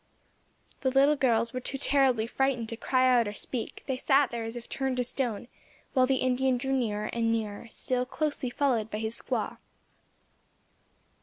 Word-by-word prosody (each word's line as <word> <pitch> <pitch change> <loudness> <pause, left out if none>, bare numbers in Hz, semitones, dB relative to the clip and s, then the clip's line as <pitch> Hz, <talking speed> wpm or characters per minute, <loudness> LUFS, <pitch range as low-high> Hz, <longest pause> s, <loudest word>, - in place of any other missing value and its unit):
The 260 - +1
little 275 +3 +4
girls 230 -4 +1
were 255 - -2
too 275 +2 -3
terribly 265 -5 +3
frightened 245 -1 -1
to 230 - -3
cry 255 +2 +2
out 245 -3 +4
or 205 - -4
speak, 240 +1 -4
they 265 -2 -2
sat 270 +1 +3
there 235 -1 -3
as 225 +1 -5
if 240 -1 -8
turned 265 -2 -2
to 250 - +1
stone, 240 -3 -2 0.5
while 255 -2 +4
the 270 - +2
Indian 255 0 +2
drew 270 +2 -2
nearer 215 -5 -1
and 230 -1 +1
nearer 220 -1 -3
still 250 +2 0
closely 290 -4 -1
followed 240 -5 0
by 210 - -4
his 220 +1 -2
squaw. - - -2
250 Hz, 175 wpm, -28 LUFS, 230-265 Hz, 0.5 s, little